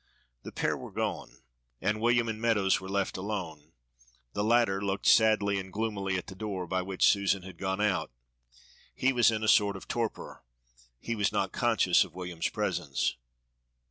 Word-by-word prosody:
The -, -, -9 dB
pair -, -, -1 dB
were -, -, -8 dB
gone, -, -, -4 dB, 0.4 s
and 105 Hz, +1 st, -1 dB
William 120 Hz, 0 st, +3 dB
and 110 Hz, -1 st, -4 dB
Meadows 105 Hz, -6 st, +2 dB
were 95 Hz, -, -8 dB
left 100 Hz, -1 st, -1 dB
alone. 90 Hz, -6 st, -5 dB, 0.6 s
The 105 Hz, -, -1 dB
latter 110 Hz, -3 st, +2 dB
looked 100 Hz, -1 st, -2 dB
sadly 105 Hz, -3 st, +4 dB
and 95 Hz, 0 st, -8 dB
gloomily 100 Hz, -2 st, -2 dB
at 90 Hz, -, -5 dB
the 95 Hz, -, -9 dB
door 95 Hz, -2 st, -4 dB
by 95 Hz, +2 st, -1 dB
which 95 Hz, 0 st, 0 dB
Susan 100 Hz, -2 st, +2 dB
had 95 Hz, -2 st, -11 dB
gone 95 Hz, 0 st, -2 dB
out. 105 Hz, -3 st, 0 dB, 0.9 s
He 135 Hz, +1 st, +2 dB
was 120 Hz, -2 st, +5 dB
in 110 Hz, -1 st, -2 dB
a -, -, 0 dB
sort 100 Hz, -2 st, +4 dB
of 95 Hz, -, -10 dB
torpor. 115 Hz, -2 st, -4 dB, 0.6 s
He 115 Hz, -, -3 dB
was 105 Hz, -2 st, +1 dB
not -, -, -1 dB
conscious -, -, +3 dB
of -, -, -13 dB
William's 90 Hz, -2 st, -3 dB
presence. -, -, -1 dB
100 Hz, 175 wpm, -29 LUFS, 95-110 Hz, 0.9 s, was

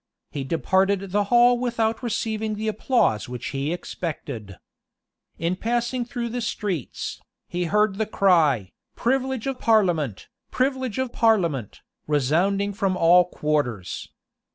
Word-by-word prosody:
He 140 Hz, -, -4 dB
departed 190 Hz, +6 st, +1 dB
the 205 Hz, +1 st, +2 dB
hall 240 Hz, +2 st, +5 dB
without 230 Hz, -2 st, 0 dB
receiving 220 Hz, -2 st, -2 dB
the 215 Hz, +1 st, -4 dB
applause 215 Hz, -, +1 dB
which 125 Hz, -1 st, -5 dB
he 140 Hz, +2 st, -2 dB
expected. 130 Hz, -, -5 dB, 0.8 s
In 170 Hz, +2 st, -1 dB
passing 240 Hz, +4 st, -1 dB
through 240 Hz, -1 st, -4 dB
the 245 Hz, +1 st, -3 dB
streets, 205 Hz, -, -3 dB, 0.3 s
he 175 Hz, 0 st, -2 dB
heard 210 Hz, +3 st, +1 dB
the 220 Hz, -, 0 dB
cry, 155 Hz, -, +3 dB, 0.2 s
"Privilege 260 Hz, -1 st, 0 dB
of 270 Hz, -2 st, -3 dB
parliament! 175 Hz, -, +1 dB, 0.2 s
privilege 260 Hz, -3 st, -1 dB
of 260 Hz, -2 st, -2 dB
parliament!" 170 Hz, -, +1 dB, 0.3 s
resounding 175 Hz, +8 st, +1 dB
from 195 Hz, -2 st, 0 dB
all 175 Hz, +1 st, +6 dB
quarters. 145 Hz, -, -2 dB
200 Hz, 125 wpm, -24 LUFS, 155-230 Hz, 0.8 s, all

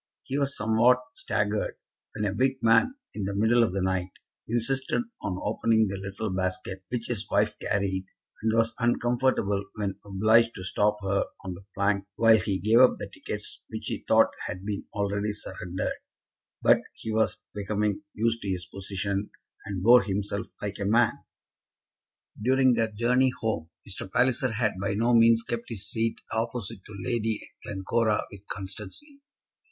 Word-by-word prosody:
He 135 Hz, -, -4 dB
was 140 Hz, -1 st, 0 dB
somewhat 110 Hz, +4 st, +4 dB, 0.2 s
staggered 105 Hz, 0 st, -1 dB, 0.4 s
when 105 Hz, -1 st, -1 dB
a 100 Hz, -, 0 dB
big 130 Hz, +5 st, +2 dB
man, 115 Hz, -, +4 dB, 0.2 s
in 100 Hz, -, -3 dB
the 100 Hz, 0 st, -3 dB
middle 115 Hz, +3 st, +4 dB
of 115 Hz, -, +1 dB
the 95 Hz, 0 st, -1 dB
night, 95 Hz, -1 st, 0 dB, 0.4 s
insisted 130 Hz, -, 0 dB, 0.2 s
on 90 Hz, -, -2 dB
opening 110 Hz, 0 st, +2 dB
the 100 Hz, -, -3 dB
little 95 Hz, +2 st, -4 dB
basket 95 Hz, +1 st, -3 dB
which 120 Hz, -2 st, -2 dB
his 110 Hz, -4 st, -3 dB
wife -, -, +2 dB
carried, 95 Hz, -1 st, -1 dB, 0.4 s
and 110 Hz, +1 st, +2 dB
was 115 Hz, 0 st, +3 dB
uncomfortable 120 Hz, -4 st, +1 dB
when 100 Hz, -2 st, -3 dB
obliged 110 Hz, +4 st, +3 dB
to 95 Hz, -, -5 dB
stop 105 Hz, +2 st, +1 dB
her 95 Hz, 0 st, +1 dB, 0.2 s
on 95 Hz, -, -3 dB
the 95 Hz, +2 st, -12 dB
plank 100 Hz, 0 st, +1 dB
while 115 Hz, -1 st, +6 dB
he 100 Hz, -3 st, -1 dB
gave 110 Hz, +5 st, +4 dB
up 130 Hz, 0 st, +6 dB
the -, -, -7 dB
tickets -, -, -6 dB
which -, -, -6 dB
he -, -, -4 dB
thought -, -, +5 dB, 0.2 s
had 90 Hz, +2 st, -6 dB
been 105 Hz, -1 st, -4 dB
already 100 Hz, 0 st, -1 dB
surrendered; 90 Hz, -3 st, -4 dB, 0.7 s
but -, -, +6 dB
he 110 Hz, -, -5 dB
was 110 Hz, 0 st, +1 dB
becoming 105 Hz, +4 st, -1 dB
used 115 Hz, +2 st, 0 dB
to 100 Hz, -, -4 dB
his 90 Hz, -1 st, -2 dB
position, 100 Hz, +2 st, -3 dB, 0.4 s
and 95 Hz, -3 st, -3 dB
bore 120 Hz, +3 st, +8 dB
himself 100 Hz, 0 st, -2 dB, 0.2 s
like 100 Hz, 0 st, -4 dB
a -, -, -1 dB
man. 115 Hz, +3 st, +4 dB, 1.3 s
During 130 Hz, +2 st, +4 dB
their 115 Hz, -1 st, +1 dB
journey 125 Hz, +4 st, +3 dB
home 85 Hz, -8 st, -2 dB, 0.2 s
Mr. 95 Hz, -1 st, -7 dB
Palliser 130 Hz, +1 st, +2 dB
had 105 Hz, -4 st, 0 dB
by 100 Hz, 0 st, 0 dB
no 115 Hz, +3 st, +2 dB
means 115 Hz, 0 st, +6 dB
kept 120 Hz, 0 st, -4 dB
his 105 Hz, -3 st, -4 dB
seat 115 Hz, +2 st, 0 dB, 0.2 s
opposite 115 Hz, -2 st, -3 dB
to 105 Hz, -, -10 dB
Lady 115 Hz, -3 st, 0 dB, 0.2 s
Glencora 105 Hz, +2 st, 0 dB
with 100 Hz, 0 st, -13 dB
constancy. 105 Hz, -, -7 dB
105 Hz, 165 wpm, -27 LUFS, 100-115 Hz, 1.3 s, bore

